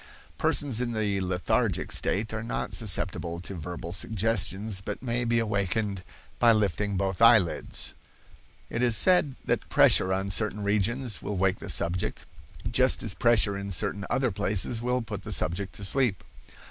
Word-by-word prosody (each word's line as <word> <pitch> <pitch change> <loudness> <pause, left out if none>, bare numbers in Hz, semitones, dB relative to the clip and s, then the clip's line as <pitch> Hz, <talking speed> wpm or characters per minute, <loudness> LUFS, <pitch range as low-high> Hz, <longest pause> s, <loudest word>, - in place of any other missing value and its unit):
Persons 130 -5 +1
in 120 -1 -2
the 105 -3 -1
lethargic 90 -3 -1
state 105 +3 +1
are 110 - -3
not 115 - -4
susceptible 90 -5 -1
to 95 - -8
verbal 85 0 -6
suggestions, 105 0 -1
but 95 - -6
may 120 -1 -1
be 115 0 +1
awakened 100 -2 -1 0.4
by 120 -1 +6
lifting 100 -1 -1
both 95 +1 -2
eyelids. 110 -7 +3 0.8
It 115 - -2
is 120 -3 +3
said 180 -7 +3
that - - -1
pressure 95 - +5
on 95 +1 -1
certain 105 +1 +1
regions 105 +3 0
will 100 -1 -4
wake 95 0 +1
the - - -8
subject, 90 +2 -1 0.5
just 130 +2 +3
as 110 - +1
pressure 105 0 +2
in 100 0 -5
certain 100 +2 0
other 130 -3 +1
places 105 +3 +1
will 125 0 -1
put 105 -3 -6
the - - -7
subject 95 +4 -1
to 100 - -8
sleep. 115 -2 +1
105 Hz, 160 wpm, -27 LUFS, 95-115 Hz, 0.8 s, by